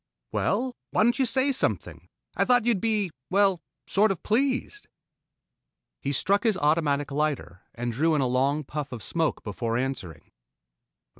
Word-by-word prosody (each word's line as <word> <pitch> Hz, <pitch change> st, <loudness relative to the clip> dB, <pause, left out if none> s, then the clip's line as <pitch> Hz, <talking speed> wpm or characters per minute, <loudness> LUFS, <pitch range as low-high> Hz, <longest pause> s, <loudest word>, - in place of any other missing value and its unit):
"Well? 245 Hz, +4 st, 0 dB
Why -, -, +2 dB
don't 235 Hz, +2 st, +2 dB
you 260 Hz, -, +3 dB
say 265 Hz, +3 st, +2 dB
something? 260 Hz, -, -2 dB, 0.3 s
Thought 245 Hz, -2 st, +3 dB
you'd 230 Hz, -6 st, +2 dB
be 210 Hz, -5 st, 0 dB, 0.2 s
well, 195 Hz, -2 st, +3 dB, 0.2 s
sort 210 Hz, +2 st, +3 dB
of 195 Hz, -4 st, -3 dB
pleased." 265 Hz, -, 0 dB, 1.1 s
He 140 Hz, -, -2 dB
struck 195 Hz, +9 st, +2 dB
his 220 Hz, -5 st, +1 dB
automatic 145 Hz, -2 st, +1 dB
lighter 145 Hz, -, -2 dB
and 120 Hz, 0 st, -2 dB
drew 155 Hz, +7 st, +2 dB
in 145 Hz, -, +2 dB
a -, -, +2 dB
long 135 Hz, +4 st, +1 dB
puff 145 Hz, 0 st, -5 dB
of 120 Hz, -4 st, -6 dB
smoke 165 Hz, -2 st, -1 dB
before 115 Hz, +2 st, -2 dB
answering. 125 Hz, -, -4 dB
165 Hz, 150 wpm, -26 LUFS, 135-220 Hz, 1.1 s, you